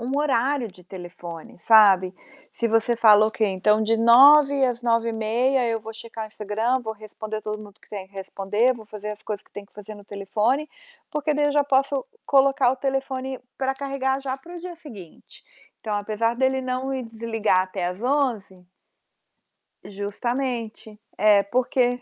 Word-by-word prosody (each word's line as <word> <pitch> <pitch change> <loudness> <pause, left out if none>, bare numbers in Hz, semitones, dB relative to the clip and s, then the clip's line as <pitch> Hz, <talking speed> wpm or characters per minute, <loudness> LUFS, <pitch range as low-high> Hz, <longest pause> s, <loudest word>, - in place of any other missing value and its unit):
um 240 +2 -4
horário 275 -3 0
de 185 -2 -17
telefone, 175 -2 -10
sabe, 195 -4 +5 0.4
se 235 - -1
você 225 +1 +1
fala: 215 -2 +6
"Ok, 220 0 0
então 210 +3 +2
de 225 +1 +1
21h 275 +4 +6
às 245 -1 -3
21h30 230 +2 +1
eu 225 -1 -1
vou 225 +1 -9
checar 225 -1 -8
Instagram, 220 +4 -2
vou 220 -1 -4
responder 215 0 -7
todo 215 0 -5
mundo 205 0 -15
que - - -23
tem 195 -3 -7
que 200 - -33
responder, 195 +5 -1
vou 225 -2 -12
fazer 210 0 -7
as 210 0 -9
coisas 210 -2 -6
que - - -31
tenho 205 0 -9
que - - -38
fazer 210 +1 -10
no 205 -1 -14
telefone, 210 +9 -1 0.4
porque 300 0 -1
daí 295 0 +2
eu 290 - 0
já 290 0 +3
posso 275 0 +1 0.2
colocar 270 -2 +4
o 265 - -5
telefone 265 -1 -3 0.2
pra 270 0 -1
carregar 270 -1 -2
já 265 -1 -4
para 345 +6 -12
o - - -6
dia 355 +1 -8
seguinte". 215 - -13 0.4
Então 215 -2 -3
apesar 215 +3 -1
dele 265 +1 +1
não 255 +1 -3
ir 260 -2 -3
desligar 225 -3 0
até 185 -1 -5
às 180 +4 -5
23h. 240 -9 -1 1.2
Justamente. 220 +1 -4 0.2
É, 205 -1 +5
porque 245 +2 0
230 Hz, 170 wpm, -23 LUFS, 210-265 Hz, 1.2 s, fala